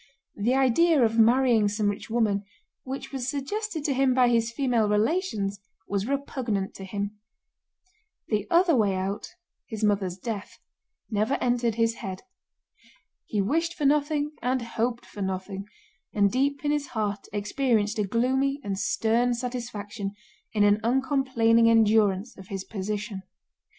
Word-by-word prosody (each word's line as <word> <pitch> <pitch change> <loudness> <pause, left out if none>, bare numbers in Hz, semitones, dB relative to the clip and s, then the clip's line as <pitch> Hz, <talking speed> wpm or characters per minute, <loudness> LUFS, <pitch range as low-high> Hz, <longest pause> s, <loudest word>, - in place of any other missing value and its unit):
The 230 +5 +1
idea 270 +3 +4
of 225 +1 0
marrying 235 -1 +5
some 210 +1 0
rich 205 - -8
woman, 215 -3 +1 0.4
which 265 +1 -6
was 265 -2 -3
suggested 315 +4 -3
to 280 - +2
him 265 -1 +2
by 250 -2 +5
his 230 -1 +2
female 235 -5 +1
relations, 210 - 0 0.3
was 200 +1 -1
repugnant 255 -8 -2
to 195 - -9
him. 200 +2 -4 1.1
The 210 -2 -1
other 340 -2 +4
way 205 -5 +2
out—his 210 - -6
mother's 195 -3 +1
death—never 215 +2 -5
entered 240 -2 0
his 230 0 +2
head. 185 -1 -6 1.0
He 205 -2 0
wished 330 - 0
for 295 - -2
nothing 295 +1 +2
and 250 0 0
hoped 235 +1 -2
for 205 - -9
nothing, 190 +1 -4 0.5
and 200 -2 +3
deep 280 +3 0
in 290 - +2
his 295 -1 -1
heart 210 -4 -3
experienced 215 +1 0
a - - +3
gloomy 265 +7 +1
and 195 -1 -3
stern 235 +4 +1
satisfaction 230 -5 -5 0.4
in 210 -2 +2
an 205 +1 +4
uncomplaining 245 -3 +3
endurance 220 -1 +3
of 190 - -11
his 195 -2 -4
position. 210 0 -4
230 Hz, 140 wpm, -26 LUFS, 205-265 Hz, 1.1 s, marrying